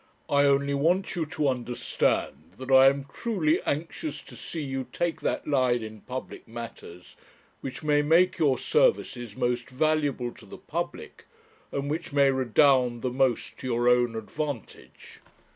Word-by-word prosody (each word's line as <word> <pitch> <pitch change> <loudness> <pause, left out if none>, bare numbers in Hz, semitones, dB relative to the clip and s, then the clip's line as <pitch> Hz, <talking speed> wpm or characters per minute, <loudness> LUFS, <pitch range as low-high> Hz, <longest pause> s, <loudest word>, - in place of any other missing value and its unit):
I 145 0 +4
only 140 0 +2
want 170 +9 +1
you 165 -3 -2
to 150 -2 -1
understand 125 -8 -1
that 130 +1 -6
I 130 0 +8
am 140 0 +2
truly 160 +1 0
anxious 165 - -3
to - - -12
see 160 -3 -5
you 135 -2 -4
take 175 -1 -2
that - - -1
line 130 -5 +2
in 110 -1 -9
public 130 0 -7
matters 115 -6 -10 0.4
which 135 +3 -7
may 145 -1 +3
make 170 +5 +3
your 145 -5 +3
services 135 - +1
most 125 0 -1
valuable 140 -3 0
to - - -16
the - - -10
public, - - -6 0.5
and 140 0 -3
which 155 0 -4
may 140 -1 +5
redound 130 -1 +3
the 130 - 0
most 130 -2 0
to - - -6
your 120 0 +1
own 125 -1 +3
advantage. 140 +2 -7
135 Hz, 155 wpm, -27 LUFS, 125-150 Hz, 0.5 s, I